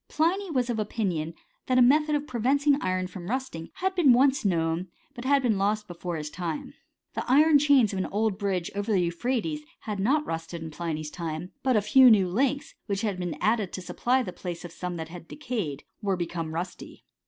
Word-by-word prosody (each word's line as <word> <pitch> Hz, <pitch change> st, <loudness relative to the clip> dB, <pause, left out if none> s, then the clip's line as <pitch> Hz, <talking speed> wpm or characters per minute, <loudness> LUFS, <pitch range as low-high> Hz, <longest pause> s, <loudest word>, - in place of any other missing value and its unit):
Pliny 365 Hz, +5 st, 0 dB
was 255 Hz, -6 st, 0 dB
of 225 Hz, -, -2 dB
opinion 180 Hz, -7 st, -2 dB, 0.3 s
that 255 Hz, -, +2 dB
a -, -, +6 dB
method 300 Hz, +4 st, +4 dB
of 290 Hz, 0 st, -1 dB
preventing 280 Hz, +3 st, +2 dB
iron 185 Hz, 0 st, 0 dB
from 180 Hz, 0 st, -8 dB
rusting 255 Hz, -10 st, -3 dB
had 380 Hz, 0 st, -1 dB
been 330 Hz, -9 st, +5 dB
once 265 Hz, +2 st, +3 dB
known, 170 Hz, -2 st, 0 dB, 0.3 s
but 240 Hz, -2 st, -8 dB
had 275 Hz, 0 st, +3 dB
been 220 Hz, -5 st, +2 dB
lost 210 Hz, +1 st, 0 dB
be* 175 Hz, -, -7 dB
fore 175 Hz, 0 st, -4 dB
his 150 Hz, -1 st, -5 dB
time. 165 Hz, -3 st, -4 dB, 0.4 s
The -, -, -2 dB
iron 300 Hz, +2 st, +6 dB
chains 275 Hz, -7 st, +4 dB
of 190 Hz, -, -2 dB
an 185 Hz, -, -1 dB
old 210 Hz, -1 st, -1 dB
bridge 190 Hz, -4 st, -1 dB
over 205 Hz, +2 st, -2 dB
the 200 Hz, -, +3 dB
Euphrates 245 Hz, -, -1 dB, 0.2 s
had 210 Hz, -3 st, -4 dB
not 285 Hz, +10 st, +2 dB
rusted 165 Hz, 0 st, -5 dB
in 160 Hz, -, -7 dB
Pliny's 155 Hz, -1 st, -4 dB
time; 165 Hz, +1 st, -5 dB
but 260 Hz, -2 st, +2 dB
a 210 Hz, -, +4 dB
few 260 Hz, +4 st, +7 dB
new 200 Hz, -5 st, +5 dB
links, 270 Hz, +9 st, 0 dB
which 200 Hz, -2 st, -1 dB
had 205 Hz, -4 st, -2 dB
been 175 Hz, -4 st, -3 dB
added 215 Hz, -3 st, +1 dB
to 185 Hz, -, -4 dB
supply 255 Hz, +7 st, +1 dB
the 180 Hz, -, -6 dB
place 175 Hz, -1 st, -6 dB
of 175 Hz, -, -8 dB
some 180 Hz, +1 st, -5 dB
that 160 Hz, -1 st, -6 dB
had 170 Hz, -1 st, -10 dB
decayed, 215 Hz, -, -4 dB, 0.2 s
were 195 Hz, -3 st, 0 dB
become 170 Hz, -2 st, -3 dB
rusty. 180 Hz, +2 st, -6 dB
205 Hz, 210 wpm, -27 LUFS, 175-260 Hz, 0.4 s, few